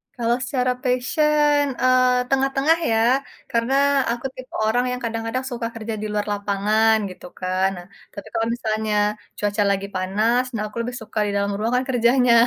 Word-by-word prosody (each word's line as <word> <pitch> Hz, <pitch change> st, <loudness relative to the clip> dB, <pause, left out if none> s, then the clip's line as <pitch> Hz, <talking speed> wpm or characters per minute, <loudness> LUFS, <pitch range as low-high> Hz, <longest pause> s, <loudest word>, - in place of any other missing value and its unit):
Kalau 240 Hz, -1 st, +1 dB
secara 255 Hz, -1 st, 0 dB
passion, 295 Hz, +3 st, +2 dB, 0.2 s
eee, 255 Hz, 0 st, +4 dB
tengah-tengah 270 Hz, +4 st, +2 dB
ya, 225 Hz, -, +3 dB, 0.5 s
karena 230 Hz, +3 st, +1 dB, 0.4 s
aku 240 Hz, +2 st, -4 dB
tipe 255 Hz, 0 st, -11 dB
orang 245 Hz, +3 st, +2 dB
yang 250 Hz, 0 st, -4 dB
kadang-kadang 230 Hz, +3 st, -3 dB
suka 235 Hz, -1 st, -3 dB
kerja 225 Hz, 0 st, -5 dB
di -, -, -3 dB
luar 210 Hz, 0 st, -1 dB
lapangan 205 Hz, +2 st, +2 dB
gitu 185 Hz, -, -11 dB
kan. 185 Hz, +1 st, +1 dB
Nah, 175 Hz, -, -9 dB, 0.3 s
tapi 200 Hz, -, -9 dB
kalau 225 Hz, -, 0 dB
misalnya 220 Hz, -2 st, -2 dB, 0.4 s
cuaca 205 Hz, 0 st, 0 dB
lagi 200 Hz, 0 st, -1 dB
panas, 215 Hz, +7 st, +1 dB
nah 210 Hz, -, -2 dB
aku 210 Hz, -, -11 dB
lebih 240 Hz, +1 st, -4 dB
suka 220 Hz, 0 st, -5 dB
di -, -, -1 dB
dalam 200 Hz, 0 st, 0 dB
ruangan 245 Hz, +4 st, +1 dB
kerjanya. 245 Hz, 0 st, +4 dB
230 Hz, 165 wpm, -22 LUFS, 210-255 Hz, 0.5 s, eee